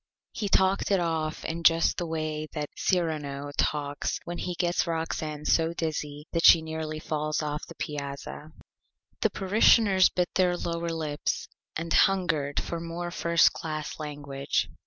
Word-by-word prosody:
He 205 - -3
talked 190 +1 +3
it 195 -2 +3
off 160 -2 -2
in 165 +1 -3
just 165 0 +4
the 175 - -2
Way 155 -1 -3
that 150 -2 -4
Cyrano 150 -6 -1
talks 145 -1 -1
when 175 0 -5
he 180 - -3
gets 175 0 0
Roxane 160 -2 -3
so 165 0 +2
Dizzy 150 -3 -4
that 165 -1 0
she 165 - +8
nearly 160 -1 -4
falls 155 0 -2
off 150 0 -4
the - - -11
Piazza. 140 +1 -6 0.7
The - - +2
Parishioners 200 -1 +4
bit 180 -1 -1
their 180 -1 +2
Lower 170 0 -3
Lips 155 -3 -2 0.3
and 165 +1 -2
hungered 160 -7 +2
for 170 - -4
more 170 +1 -5
First 170 -1 +3
Class 155 -1 -5
Language. 145 -2 -2
160 Hz, 150 wpm, -27 LUFS, 150-175 Hz, 0.7 s, she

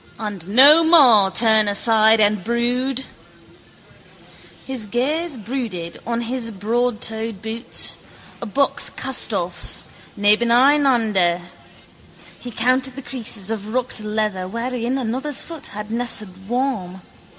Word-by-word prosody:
And 205 -6 -6
no 280 +10 +7
more 255 - +6
turn 220 0 +3
aside 220 +2 +3
and 210 -2 +2
brood. 245 +3 -1 1.6
His 255 -5 -5
gaze 285 - -1
brooded 215 -7 -5
on 235 0 -2
his 240 0 -2
broadtoed 225 0 -2
boots, 225 +2 -2 0.4
a 235 - -5
buck's 280 +7 +1
castoffs, 200 -9 -1 0.3
nebeneinander. 230 -4 +3 1.0
He 245 - -8
counted 255 +3 0
the 275 - -8
creases 225 -6 -3
of 215 +1 -5
rucked 250 -3 0
leather 210 -3 -2
wherein 240 +4 -3
another's 265 +3 -3
foot 325 -3 -8
had 210 +1 -8
nested 215 -5 -3
warm. 230 -8 -3
230 Hz, 105 wpm, -20 LUFS, 210-255 Hz, 1.6 s, no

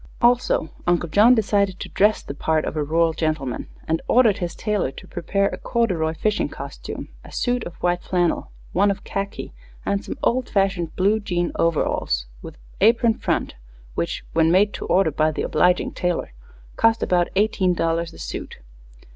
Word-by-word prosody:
Also, 240 -9 +2 0.2
Uncle 175 0 +2
John 220 +8 +6
decided 200 -4 +1
to - - -5
dress 210 +2 +2
the - - -6
part 155 +2 0
of - - -4
a 150 - 0
rural 165 +2 +2
gentleman, 155 -6 -2 0.2
and 160 +1 0
ordered 230 -5 +4
his 175 -2 -3
tailor 210 -9 -1
to - - -12
prepare 195 +3 -1
a - - -7
corduroy 180 -10 0
fishing 210 +5 0
costume, - - -7
a - - -13
suit 245 -1 0
of 170 - -8
white 175 0 +1
flannel, 175 -2 0 0.2
one 200 +3 +3
of 200 - -2
khaki, 200 0 -5 0.3
and 200 0 0
some - - -6
old 250 +1 +1
fashioned 195 -4 0
blue 205 +4 +2
jean 175 -4 -1
overalls, 145 - 0 0.2
with - - -10 0.2
apron 230 +2 +4
front, - - -2 0.4
which, 85 +6 -3
when 165 0 +3
made 205 +3 +4
to - - -6
order 185 -4 +3
by 155 +2 +2
the 155 - -3
obliging 180 +3 +2
tailor, 175 - -2 0.4
cost 225 0 +3
about 175 -1 +2
eighteen 190 -3 +2
dollars 165 0 0
a - - -14
suit. - - -6
180 Hz, 170 wpm, -22 LUFS, 165-210 Hz, 0.4 s, John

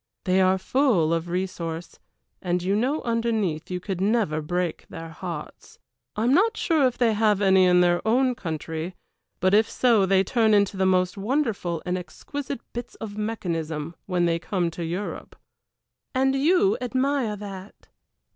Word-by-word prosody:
They 185 +1 +2
are 185 0 +4
full 190 - +2
of 165 +1 -2
resource, 175 -2 -4 0.4
and 180 -1 -1
you 195 +2 +1
know 260 +8 0
underneath 225 -9 -1
you 180 -1 -3
could 185 0 -4
never 200 -7 +1
break 175 +2 -3
their 165 0 -8
hearts. 165 -2 -8 0.4
I 215 - -1
am 245 +3 +3
not 435 +7 +3
sure 310 -6 +3
if 250 - -4
they 235 -3 +3
have 210 -2 +2
any 190 -2 +5
in 180 0 +5
their 175 0 +3
own 250 +4 +2
country, 165 -2 -5 0.4
but 185 +1 +2
if 215 +1 +4
so 225 -6 +3
they 190 0 +4
turn 220 +1 +3
into 200 -1 +2
the 190 0 +1
most 185 0 +2
wonderful 205 - -1
and 180 +1 -1
exquisite 275 +8 -6
bits 240 0 -6
of 210 -2 -7
mechanism 165 -8 -3
when 180 -2 +1
they 170 -1 +1
come 175 -1 -1
to 170 +1 -6
Europe." 180 +5 -5 0.8
"And 265 +1 +3
you 360 +7 +3
admire 260 -2 0
that." 195 -1 -10
195 Hz, 165 wpm, -25 LUFS, 175-235 Hz, 0.8 s, any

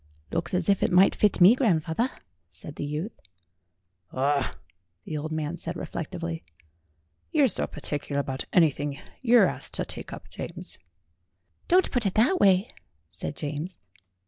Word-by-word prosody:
"Looks 170 +2 -1
as 180 -1 0
if 200 -1 +3
it - - +2
might 185 +2 +6
fit 210 -2 +2
me, 185 +6 +8
grandfawther," 200 - +1 0.4
said 90 +12 -10
the - - -3
youth. 150 +9 -4 0.9
"Ah 140 +1 0 0.2
!" 90 -1 -49
the 155 - -5
old 155 +1 -4
man 155 +1 -2
said - - -3
reflectively, 80 0 -5 0.9
"you're 290 -3 +4
so 210 - -1
par 150 - -10
ticular 145 -1 -2
about 135 -1 -2
anything 145 -4 +2 0.2
you're 240 -4 +6
asked - - -2
to - - -1
take - - -6
up, - - -9
James." - - -6 0.9
"Don't 365 +1 +4
put 245 -5 +2
it 190 - -3
that 250 - +4
way," 195 +2 +4 0.4
said - - -4
James. 150 +4 -5
165 Hz, 155 wpm, -27 LUFS, 145-200 Hz, 0.9 s, me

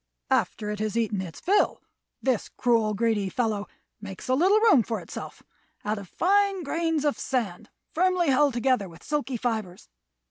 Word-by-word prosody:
"After 210 -1 0
it 210 - -5
has 215 +1 -2
eaten 215 -4 0
its 170 -4 -8
fill, 400 +3 +2 0.4
this 255 -5 0
cruel, 225 -4 +1
greedy 215 -3 +1
fellow 215 -2 -1 0.3
makes 195 +1 -8
a 255 - +2
little 375 +10 +4
room 430 - +6
for 225 +1 -3
itself - - -9 0.4
of 205 -2 -3
fine 395 0 +2
grains 325 0 -1
of 290 - 0
sand 225 -9 -2 0.2
firmly 360 -1 +2
held 275 -1 +3
together 245 -5 +1
with 165 +1 -15
silky 290 -4 -2
fibres. 220 - -3
240 Hz, 155 wpm, -26 LUFS, 210-300 Hz, 0.4 s, room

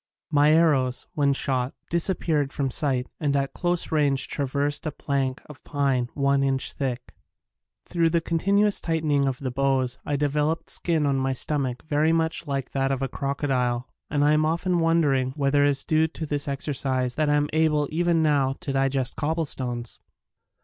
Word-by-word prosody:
My 145 0 +4
arrows, 145 -6 +2
when 140 -2 +2
shot, 130 -1 -1 0.2
disappeared 165 -4 0
from 135 -2 -2
sight 130 -2 0
and 145 -3 0
at 135 -1 -1
close 175 -1 -1
range 145 -4 +2
traversed 145 +2 -1
a - - -1
plank 135 -3 -2
of 150 -3 -13
pine 135 -4 0
one 140 -1 +2
inch 135 -1 0
thick. 130 -3 -4 0.7
Thru 170 -2 +1
the 170 +1 +2
continuous 200 +5 +1
tightening 155 -4 +1
of 130 -2 -1
the 130 -1 -4
bows 130 -1 0
I 145 - -2
developed 150 +3 0
skin 160 -4 +1
on 140 -1 +1
my 135 0 0
stomach 130 -2 -1
very 155 +1 +1
much 165 0 -1
like 135 -2 -3
that 135 0 0
of 135 0 -1
a - - 0
croco 140 +2 -3
dile 125 -2 0 0.2
and 145 -1 +1
I 150 - +4
am 155 0 +3
often 170 +3 0
wondering 145 -6 +2
whether 145 -1 +2
it 145 - +4
is 140 -1 -1
due 160 0 +2
to 160 0 -6
this 145 -1 -2
exercise 135 -2 -1
that 155 +1 0
I 145 - +3
am 145 0 +2
able 155 -2 +2
even 170 0 +2
now 140 -3 +2
to 145 -6 -3
digest 135 -1 0
cobble 160 +2 0
stones 120 -4 -5
145 Hz, 180 wpm, -25 LUFS, 135-155 Hz, 0.7 s, My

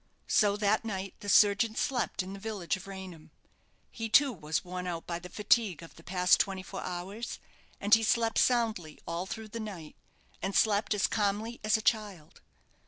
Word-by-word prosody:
So 205 -1 +3
that 210 +1 +2
night 195 -3 -4
the 205 - -6
surgeon 210 +3 +5
slept 245 -7 -1
in 190 +1 -8
the 200 - -8
village 200 -5 -2
of 190 0 -10
Raynham. 185 -5 -9 0.6
He, 225 -1 -5
too, 275 +3 +5
was 155 -4 -3
worn 180 0 -5
out 170 -2 -4
by 170 -1 -3
the 180 +1 -10
fatigue 210 -5 +1
of 165 - -12
the - - -14
past 180 +1 +3
twenty 190 -2 -1
four 190 0 -7
hours, 190 +6 -5 0.4
and 205 +1 +1
he 225 - +8
slept 225 0 +2
soundly 220 -11 +1
all 170 +3 -3
through 220 +2 -6
the 230 +2 -6
night, 190 -8 -7 0.5
and 195 +1 -2
slept 210 0 +3
as 200 - +2
calmly 215 +2 -1
as 215 0 +3
a 220 - -7
child. 205 -9 -1
200 Hz, 185 wpm, -30 LUFS, 180-220 Hz, 0.6 s, he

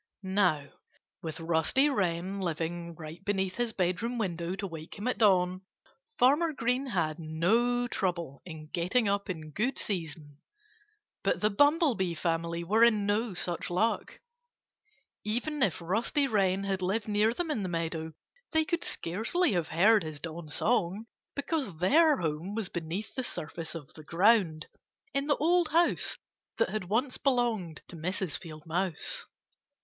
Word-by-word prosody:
Now, 185 -6 +2 0.6
with 160 -1 -5
Rusty 165 - +3
Wren 190 -6 -1
living 170 0 -3
right 160 +2 -9
beneath 190 -2 -1
his 240 -1 0
bedroom 195 +6 -1
window 175 -4 -2
to 195 +1 -4
wake 165 -2 -8
him 205 +4 -4
at 250 - -1
dawn, 185 -3 +4 0.6
Farmer 300 +6 +4
Green 250 +1 0
had 170 -8 -1
no 225 +10 +1
trouble 170 - -2
in 160 -4 -9
getting 185 +8 +1
up 200 0 0
in 155 -4 -5
good 240 - -1
season. 155 -6 -4 0.8
But - - +1
the 210 0 +2
Bumblebee 270 - +3
family 170 +1 -1
were 215 +6 +3
in 215 -3 +4
no 205 0 0
such 175 -1 -2
luck. 215 +6 0 1.0
Even 250 +8 -1
if 195 -9 +3
Rusty 225 - +1
Wren 195 -5 +2
had 195 -1 -1
lived 200 +5 -1
near 210 +1 +3
them 330 +6 -2
in 245 -8 -1
the 185 - -2
meadow 165 -1 -3 0.4
they 315 0 +4
could 340 +1 -1
scarcely 225 - 0
have 170 -3 0
heard 210 +6 +5
his 155 -2 -6
dawn 165 0 -6
song, 200 +4 0 0.3
because 280 - -2
their 295 - +5
home 165 +4 -3
was 220 -4 -2
beneath 175 +6 -4
the 260 - -2
surface 165 -5 -4
of 150 -4 -9
the 155 - -12
ground, 175 -1 +3 0.5
in 275 +1 0
the 290 - +3
old 345 +2 +3
house 335 +2 +2 0.4
that 225 - +2
had 215 -3 -2
once 240 +8 0
belonged 235 - 0
to - - -10
Mrs. 180 +1 -2
Field 155 -4 -10
Mouse. 185 - -2
190 Hz, 155 wpm, -30 LUFS, 170-235 Hz, 1.0 s, heard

